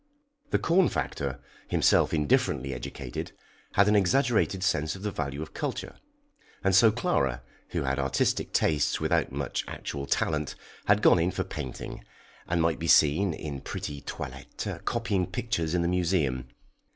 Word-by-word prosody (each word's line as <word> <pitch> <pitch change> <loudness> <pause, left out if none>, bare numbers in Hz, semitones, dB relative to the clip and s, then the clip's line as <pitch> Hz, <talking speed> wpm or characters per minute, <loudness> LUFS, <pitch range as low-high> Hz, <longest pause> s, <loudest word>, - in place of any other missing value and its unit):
The - - +3
corn 175 +2 +3
factor, - - -3 0.3
himself - - +3
indifferently 70 -3 +1
educated, 60 +1 -6 0.4
had 100 +1 +5
an 105 - +4
exaggerated 105 -1 +2
sense 75 -4 +1
of 95 - -10
the 105 - -1
value 75 -3 -3
of 80 - -11
culture, - - -4 0.7
and 95 -1 +3
so 110 +4 +7
Clara, 60 -10 0 0.3
who - - -2
had 65 +1 -1
artistic 65 0 0
tastes 75 -3 +2
without - - +1
much 70 -1 -2
actual 70 -1 -5
talent, 75 +1 0 0.3
had 100 +1 +3
gone - - +6
in 85 +2 +2
for 95 - -2
painting, 75 -8 -6 0.4
and 85 -1 +1
might 85 -1 +1
be 85 - -3
seen, 80 +6 +5
in 70 -3 -6
pretty 70 -1 -5
toilettes, - - -6 0.2
copying 110 -6 0
pictures 100 -9 -2
in 85 - +2
the - - +1
Museum. 85 -8 0
80 Hz, 150 wpm, -28 LUFS, 70-95 Hz, 0.7 s, so